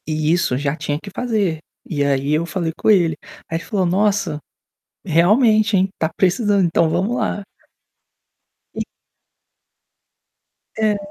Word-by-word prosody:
E 155 0 0
isso 170 -8 +1
já 140 +1 -1
tinha 145 -2 -3
que 200 - -9
fazer. 205 -7 -1 0.3
E 145 -4 -1
aí, 140 0 0
eu 160 +2 +1
falei 170 0 -2
com - - 0
ele. 175 -6 +4 0.3
Aí, 165 - -1
ele 165 - -7
falou: 195 -4 0
"Nossa, 195 -3 +1 0.7
realmente, 215 - +3
hein? 190 +1 +2
Está 160 - -1
precisando, 200 +1 +2
então, 165 -1 +2
vamos 185 +9 0
lá". 205 - -2 1.3
E - - -3 2.0
É. 215 -2 +1
175 Hz, 135 wpm, -20 LUFS, 160-205 Hz, 2.0 s, ele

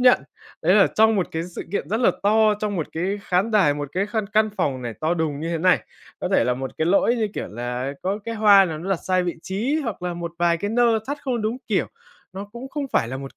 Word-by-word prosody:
nhận. 250 - +5 0.4
Đấy 180 +4 +4
là 205 - +6
trong 220 +1 +5
một 185 - 0
cái 160 0 -2
sự - - -3
kiện 175 - -2
rất 220 +3 0
là 245 - +5
to, 215 +1 +4
trong 210 -2 -2
một 165 - -2
cái 190 +5 -2
khán 185 +5 +1
đài, 190 -10 +4
một 145 -1 -4
cái 195 +3 0
khăn 215 -1 -2
căn 215 +1 +2
phòng 130 -3 -1
này 120 -2 -5
to 160 +2 +1
đùng 155 -4 -2
như 165 - -3
thế 170 - -1
này, 180 +3 +4 0.4
có - - -2
thể - - +4
là 125 - +1
một 130 +1 -5
cái 160 - +1
lỗi, 200 +6 +3
như 220 -2 0
kiểu - - -4
là, 125 +4 -4
có 195 +3 -1
cái 230 0 -4
hoa 205 -2 +6
nào 160 -4 -4
nó 185 +4 -5
đặt 195 - +2
sai 185 -1 +2
vị 175 - -2
trí, 245 +11 -1
hoặc 220 -6 -5
là 180 -1 -2
một 170 -1 -5
vài 170 -1 +3
cái 205 +5 -3
nơ 230 -1 +3
thắt 285 +1 -3
không 245 -5 -2
đúng 220 +3 -1
kiểu, - - +1 0.5
nó 195 +2 -6
cũng 245 +3 -8
không 280 0 -4
phải 115 - +2
là 130 - -4
một 135 0 -9
190 Hz, 275 wpm, -23 LUFS, 160-220 Hz, 0.5 s, là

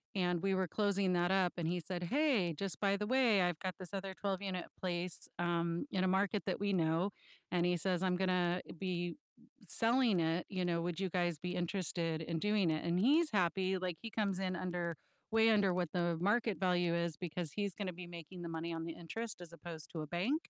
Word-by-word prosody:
and 180 -2 +1
we 195 -1 +2
were 185 -1 +1
closing 200 -1 +1
that 175 +1 +2
up 190 -2 +3
and 165 -2 -1
he 175 +1 0
said, 175 +1 -4
"Hey, 235 - +2
just 185 0 -4
by 200 -1 +3
the 210 +1 -2
way, 245 -6 +4
I've 175 -3 +1
got 185 -2 -3
this 185 +1 -8
other 195 -1 -3
twelve-unit 190 -2 -2
place," 175 -1 -2
um, 170 +2 0
in 185 -1 +1
a - - +3
market 195 +2 +2
that 185 - -1
we 200 -1 +1
know, 165 +3 +2 0.4
and 175 -1 +2
he 180 - +3
says, 185 +1 0
"I'm 180 -1 +2
gonna 180 -1 +2 0.2
be 175 -1 -2 0.5
selling 230 -4 +3
it, 165 +2 +1
you 185 -2 -1
know, 170 -1 +1
would 175 -1 -2
you 190 -1 0
guys 175 -2 0
be 180 +1 -3
interested 170 -2 -1
in 165 0 -2
doing 210 -2 +2
it?" 155 +1 0
And 170 +1 +2
he's 300 - +4
happy, 190 0 +2
like, 180 -2 -2
he 225 - -5
comes 200 -4 0
in 185 -1 -1
under 175 -2 -2 0.4
way 225 0 +5
under 200 -4 +4
what 175 -3 -1
the 175 -2 +1
market 210 +1 +2
value 175 -2 +2
is 170 -2 0
because 175 -3 -4
he's 200 -3 -1
gonna 195 -3 -3
be 175 0 -8
making 175 +1 -9
the - - -4
money 165 +1 -3
on 165 0 -3
the 165 - -4
interest 215 +5 -5
as 170 -1 -9
opposed 170 -2 -9
to 165 - -5
a 155 - -5
bank. 215 - -1
180 Hz, 220 wpm, -35 LUFS, 170-195 Hz, 0.5 s, way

